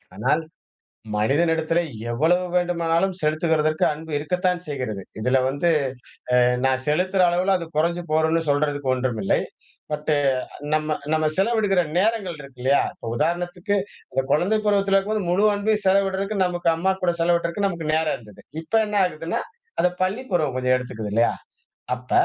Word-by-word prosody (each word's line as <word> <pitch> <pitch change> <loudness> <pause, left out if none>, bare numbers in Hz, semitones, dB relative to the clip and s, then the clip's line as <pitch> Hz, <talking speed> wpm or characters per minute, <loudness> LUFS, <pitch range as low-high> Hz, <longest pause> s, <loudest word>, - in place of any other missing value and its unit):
ஆனால் 150 +2 +1 0.7
மனிதனிடத்திலே 160 +8 +2 0.3
எவ்வளவு 165 +9 +2
வேண்டுமானாலும் 175 +1 +1
செலுத்துகிறதற்கு 155 0 +1
அன்பு 160 +1 -9
இருக்கத்தான் 180 +3 0
செய்கிறது. 125 -9 -4 0.2
இதுல 125 +3 +3
வந்து 145 +5 0 0.7
அ - - +6 0.3
நான் 130 0 0
செலுத்துற 185 +4 +2
அளவுல 185 +3 +2
அது 170 -2 -7
கொறைஞ்சு 170 +2 +1
போகுன்னு 160 +1 +2
சொல்றதுக்கு 145 -2 +1
ஒன்றுமில்லை. 125 -6 0 0.5
பட், 150 +1 -2 0.6
நம்ம 155 0 +1 0.2
நம்ம 155 0 +2
செலவிடுகிற 200 -2 +2 0.2
நேரங்கள் 200 -3 +1
இருக்கு 135 -3 -13
இல்லையா? 140 +2 +4
இப்ப 115 - -8
உதாரணத்துக்கு, 175 +6 -1 0.4
அந்த 135 0 0
குழந்தை 190 +8 +2
பருவத்துல 200 -1 +3
இருக்கும்போது 200 -1 0
முழு 190 +4 +3
அன்பையும் 210 +1 0
செலவிடுறதுக்கு 195 +1 +1
நமக்கு 175 -1 -1
அம்மா 190 +4 +1
கூட 175 -1 +2
செலவிடுறதுக்கு 170 +3 +1
நமக்கு 170 -5 -2
நேரம் 160 0 +1
இருந்தது. 105 -4 -15 0.2
இப்ப 165 +7 -2
என்ன 210 0 -3
ஆகுதுன்னா, 165 0 -3 0.4
அத 180 - +3
பள்ளி 195 +7 0
பருவம் 155 -8 +1
கொஞ்சம் 130 0 +2
எடுத்துக்குது 110 -5 -5
இல்லையா? 115 +2 +3 0.6
அப்ப 125 0 -14
165 Hz, 140 wpm, -23 LUFS, 145-185 Hz, 0.7 s, அ